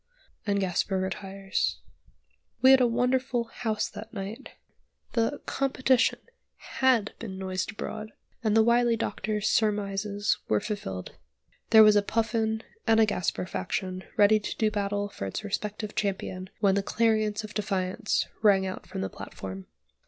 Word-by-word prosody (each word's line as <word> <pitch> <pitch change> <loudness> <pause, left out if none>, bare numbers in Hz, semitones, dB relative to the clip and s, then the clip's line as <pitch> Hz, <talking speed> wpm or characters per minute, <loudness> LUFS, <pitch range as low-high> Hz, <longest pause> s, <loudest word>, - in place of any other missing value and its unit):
And 200 0 +2
Gasper 190 +1 0
retires. 190 - -2 0.9
We 260 - +9
had 265 -1 +7
a 245 - +5
wonderful 250 +1 +1
"house" 225 -2 -2
that 215 +2 -9
night. 210 +5 -6 0.6
The 230 +5 0
"competition" 260 -2 +2 0.6
had 250 -6 +3
been 195 -5 -6
noised 190 +1 -3
abroad, 215 +1 -6 0.3
and 215 -1 +3
the 220 - +7
wily 235 0 +3
doctor's 210 0 -2
surmises 205 -1 +1
were 105 - +2
fulfilled. 95 - -5 0.6
There 220 -1 +9
was 215 -1 +7
a 205 - +5
Puffin 220 +1 0 0.2
and 225 0 +5
a 220 - +7
Gasper 180 -4 -1
faction 185 - -3
ready 210 +1 +6
to 205 - -5
do 215 -1 +2
battle 205 0 -1
for 100 - -6
its 95 - -4
respective 210 +1 -3
champion 190 -2 -3
when 200 -2 +4
the 200 - +2
clarion 215 0 +1
of 215 - -8
defiance 195 -1 -1 0.2
rang 200 -3 +5
out 185 - -6
from - - -5
the 95 - -1
platform. 95 -1 -8
210 Hz, 145 wpm, -28 LUFS, 195-225 Hz, 0.9 s, We